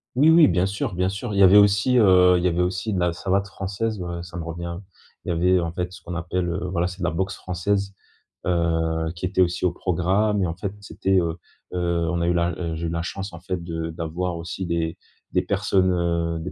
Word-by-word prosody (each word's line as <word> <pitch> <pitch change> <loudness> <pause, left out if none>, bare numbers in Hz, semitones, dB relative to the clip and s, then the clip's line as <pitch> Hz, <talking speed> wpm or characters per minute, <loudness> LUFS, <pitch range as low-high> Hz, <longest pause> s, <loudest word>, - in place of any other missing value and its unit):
Oui, 150 +5 +5
oui, 165 -2 +7
bien 90 +1 +2
sûr, 100 +1 -3
bien 90 +1 +1
sûr. 105 +3 -5
Il 100 - 0
y 100 - +7
avait 95 +2 +8
aussi, 105 +5 +4
heu 90 -3 +6
il 85 - -3
y - - +3
avait 90 0 +1
aussi 95 +4 -2
de 95 - 0
la 90 -1 +1
savate 100 +3 0
française, 100 +3 -3
voilà, 85 -1 -5
ça 85 0 -11
me 85 - -4
revient. 85 +1 -5 0.5
Il - - -4
y - - +2
avait 90 +2 +3
en 85 -1 -2
fait, 90 +1 -3
ce - - -12
qu'on 85 - -6
appelle, 90 +1 -2
heu 90 +1 -3
voilà, 85 -1 0
c'est 90 +2 -8
de - - -5
la - - +1
boxe 95 +3 -2
française, 100 +2 -2 0.5
heu, 80 -2 0
qui 85 - -4
était 95 0 +1
aussi 90 +1 +1
au 90 - +3
programme. 95 +4 +1
Et 90 - +1
en 85 - -4
fait, 95 +2 -4
c'était, 95 -1 0
heu 85 -1 -2 0.4
heu, 85 -1 0
on 85 -1 -1
a 85 - +1
eu 85 - +3
la 85 0 +1
heu, 85 -2 -3
j'ai 85 +1 -3
eu - - -1
la 85 0 -2
chance 95 +2 -5
en 85 - -8
fait, 90 0 -4
de 80 -1 -4
d'avoir 85 +2 -3
aussi 85 +3 -5
des 85 0 -2 0.4
des - - +3
personnes, 95 -1 +1
heu, 85 -1 0
des 85 +3 -5
90 Hz, 250 wpm, -23 LUFS, 85-95 Hz, 0.5 s, avait